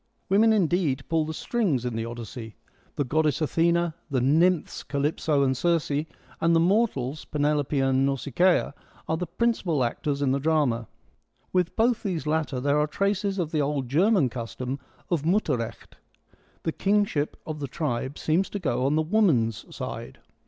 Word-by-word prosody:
Women 215 +4 +5
indeed 175 -9 +1
pull 160 -1 +2
the 160 - -4
strings 175 - 0
in 125 - -2
the - - -2
THE 115 - -2
EARLY - - -5
EPIC - - -10
9 - - -5 0.2
Odyssey: 110 - -13 0.4
the 145 - 0
goddess 150 +2 +1
Athena, 170 +1 +1 0.2
the 135 -3 +1
nymphs, 160 +6 +2
I - - -22
Calypso 145 0 +1
and 130 -1 +2
Circe, 165 +2 +1
and 160 +3 -1
the - - +5
mortals, 165 - +1
Penelope 145 -1 0
and 135 0 +2
Nausicaa, 140 +5 +2 0.3
are 160 - 0
the 180 +1 -3
principal 175 - 0
actors 140 +4 -1
in 135 - +2
the 135 - +1
drama. 140 -7 +1 0.7
With 180 -2 +1
both 235 0 +2
these 180 -8 -3
latter 155 -3 0
there 145 +3 +2
are 150 - +2
traces 200 +3 -1
of 170 -4 -2
the 155 - +1
old 140 -3 -1
German 175 - +3
custom 125 +3 -5 0.3
of 170 -4 +2
Mutterrecht: 140 - -1 0.7
the 160 - 0
kingship 200 -6 0
of 155 -1 -5
the 140 - -3
tribe 130 -1 -3
seems 170 +5 +1
to - - -4
go 130 -6 0
on 145 - +2
the 155 - +2
woman's 155 - +2
side. - - -6
155 Hz, 175 wpm, -26 LUFS, 135-175 Hz, 0.7 s, Women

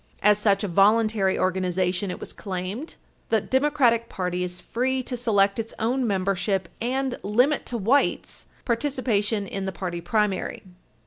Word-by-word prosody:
As 210 0 +5
such 205 -1 +2
a - - 0
voluntary 205 +1 +3
organization, 185 0 0
it 180 - -5
was - - -7
claimed, 195 - -5 0.3
the 220 - +3
Democratic 260 -2 +2
party 180 -1 -2
is 180 0 -5
free 260 +2 -1
to 250 - -4
select 205 -4 +2
its 225 0 -5
own 245 +3 0
membership 195 -1 0
and 260 +2 -1
limit 250 +8 +2
to 240 - -3
whites 235 +7 0 0.2
participation 230 -5 0
in 195 0 -4
the 190 - -2
party 175 -1 -5
primary. 210 +2 -1
210 Hz, 145 wpm, -25 LUFS, 190-240 Hz, 0.3 s, As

